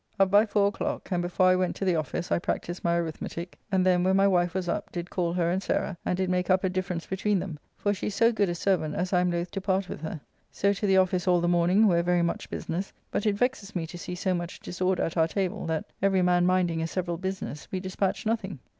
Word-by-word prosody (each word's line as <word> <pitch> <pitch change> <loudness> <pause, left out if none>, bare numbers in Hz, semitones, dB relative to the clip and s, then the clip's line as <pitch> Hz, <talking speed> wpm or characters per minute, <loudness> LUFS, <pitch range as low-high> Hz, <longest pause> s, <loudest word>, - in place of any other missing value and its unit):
Up 195 -1 +4
by 205 +2 +6
four 205 -1 +3
o'clock, 205 - -4
and 175 -1 +1
before 180 +1 +1
I 185 0 +6
went 185 -1 0
to 195 - -3
the 180 -2 +3
office 155 +2 -3
I - - +3
practised 175 +1 -3
my 170 0 +2
arithmetique, 170 +1 -4 0.2
and 185 -1 +2
then, 180 -1 +4
when 190 +1 +3
my 195 0 +5
wife 175 -2 +2
was 185 -2 -1
up, 200 - -2
did 175 0 -5
call 175 -2 0
her 170 -1 +1
and 185 +2 0
Sarah, 180 - -1
and 180 - -1
did 190 0 0
make 180 0 0
up 185 +1 +3
a 190 - +2
difference 185 -2 -3
between 195 +2 0
them, 175 -4 -5 0.2
for 205 - +1
she 205 - -4
is 205 - -3
so 230 +3 +4
good 205 -4 +1
a 175 - -1
servant 170 -4 0
as 180 +2 -2
I 180 - +5
am 180 - +2
loth 170 0 -2
to 195 - -4
part 190 -1 0
with - - -6
her. 160 0 -5 0.3
So 200 +1 +2
to 205 +1 -2
the 190 -1 +4
office 185 -1 +2
all 180 -1 +5
the 175 - 0
morning, 175 +5 +4
where 175 -4 +4
very 175 0 +2
much 170 - -2
business, 180 +4 -4 0.2
but 210 - -1
it 205 - +2
vexes 235 -4 -1
me 170 -2 -1
to 170 +2 -9
see 180 - -5
so 185 +1 0
much 175 0 -4
disorder 185 0 -1
at 165 - -3
our 160 -1 +4
table, 195 +2 -2
that, 160 -1 -1 0.2
every 195 -1 +3
man 180 0 +3
minding 180 -3 +2
a 165 - -1
several 175 -1 -2
business, 190 -5 -5
we 185 - -1
dispatch 190 +2 -2
nothing. 215 -6 -1
185 Hz, 265 wpm, -27 LUFS, 175-195 Hz, 0.3 s, by